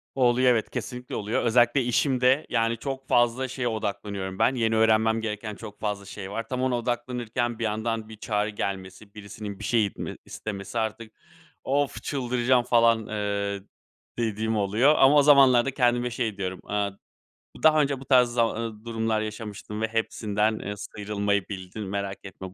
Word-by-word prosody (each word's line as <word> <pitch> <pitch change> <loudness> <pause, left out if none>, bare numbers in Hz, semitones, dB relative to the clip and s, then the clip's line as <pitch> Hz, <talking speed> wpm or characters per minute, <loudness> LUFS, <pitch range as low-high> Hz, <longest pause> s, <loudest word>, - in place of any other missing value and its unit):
Oluyor, 125 -1 +4
evet, 115 -3 +1
kesinlikle 125 -1 -5
oluyor. 105 +1 -1
Özellikle 120 +3 +4
işimde, 130 +2 +2
yani, 115 -1 +1
çok 135 +2 -5
fazla 120 +2 +2
şeye 130 -1 -3
odaklanıyorum 100 -3 -4
ben, 130 - +3
yeni 115 -2 +1
öğrenmem 110 0 +3
gereken 105 -1 -4
çok 105 -1 -10
fazla 105 -2 -3
şey 95 0 -8
var. 115 +1 -4
Tam 125 +1 -3
ona 130 -1 +1
odaklanırken 120 -1 -2
bir - - -2
yandan 110 0 -2
bir 110 - -10
çağrı 105 0 -1
gelmesi, 100 0 -5
birisinin 100 -1 -8
bir - - -8
şey 115 0 +2
itme 100 - -6
istemesi, 100 +1 -5
artık 110 0 -3 0.5
of, 135 -4 -1
çıldıracağım 125 -2 +1
falan, 115 -2 +3
eee, 100 -1 -2 0.6
dediğim 110 -1 -1
oluyor 110 +9 +3
ama 135 +2 +6
o 145 - +7
zamanlarda 135 -3 +6
kendime 125 -1 +2
şey 115 -4 -2
diyorum, 95 -1 -3
eee, 100 -1 0 0.7
daha 155 -1 +6
önce 140 -2 0
bu 135 - -11
tarz 125 -3 +5
zama 120 -2 +1
eee, 115 -1 -6
durumlar 115 -1 -1
yaşamıştın 105 0 -6
ve 110 - +1
hepsinden, 110 -1 0
eee, 105 +1 -5
sıyrılmayı 100 -1 -2
bildin, 95 +1 -6
merak 100 0 -4
etme, 95 -1 -9
110 Hz, 160 wpm, -26 LUFS, 105-125 Hz, 0.7 s, o